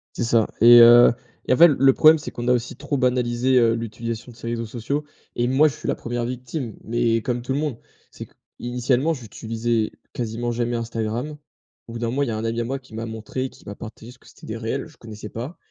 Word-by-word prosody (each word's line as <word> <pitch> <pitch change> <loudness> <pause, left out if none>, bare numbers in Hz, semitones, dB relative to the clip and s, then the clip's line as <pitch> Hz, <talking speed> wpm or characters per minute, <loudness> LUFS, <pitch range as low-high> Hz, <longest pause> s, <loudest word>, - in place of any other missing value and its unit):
C'est - - -1
ça 115 -1 +3
et 120 +2 +9
heu, 120 +1 +8 0.3
et - - +2
en 130 - +4
fait 170 - +9
l 145 - +1
le 135 0 +6
problème 155 +3 +6
c'est - - -7
qu'on 120 0 -5
a - - +5
aussi 125 0 -2
trop 145 +1 -3
banalisé, 125 0 +1
heu, 115 -2 +3
l'utilisation 115 +1 -5
de - - -19
ces 115 - -7
réseaux 115 0 -3
sociaux 125 +6 -3 0.3
et 120 - +1
moi 135 +5 +4
je 145 - -6
suis - - -7
la - - +1
1re 120 0 -4
victime, 125 0 -5
mais 115 0 0
comme 120 0 -2
tout 125 - -3
le 135 - -1
monde, 145 -6 -3 0.3
c'est - - -9
que - - -30 0.2
initialement 125 +5 0
j'utilisais 115 -2 -3 0.2
quasiment 120 0 -3
jamais 120 0 -1
Instagram, 115 +5 -3 0.5
au 115 - -10
bout 115 - -6
d'un 120 - -1
moment, 135 +4 -1
il 140 - -1
y - - -1
a 110 - -2
un 110 - -4
ami 115 +1 -1
à - - -1
moi 135 +4 -3
qui 130 -4 -17
m'a 115 +1 -4
montré, 110 +4 -5
qui - - -19
m'a 100 - -6
partagé 110 +1 -10
ce 125 - -17
que - - -24
c'était - - -15
des 110 - -5
reels, 115 +4 -3
je 155 - -20
connaissais 110 -2 -9
pas. 125 +11 -7
120 Hz, 250 wpm, -22 LUFS, 115-130 Hz, 0.5 s, et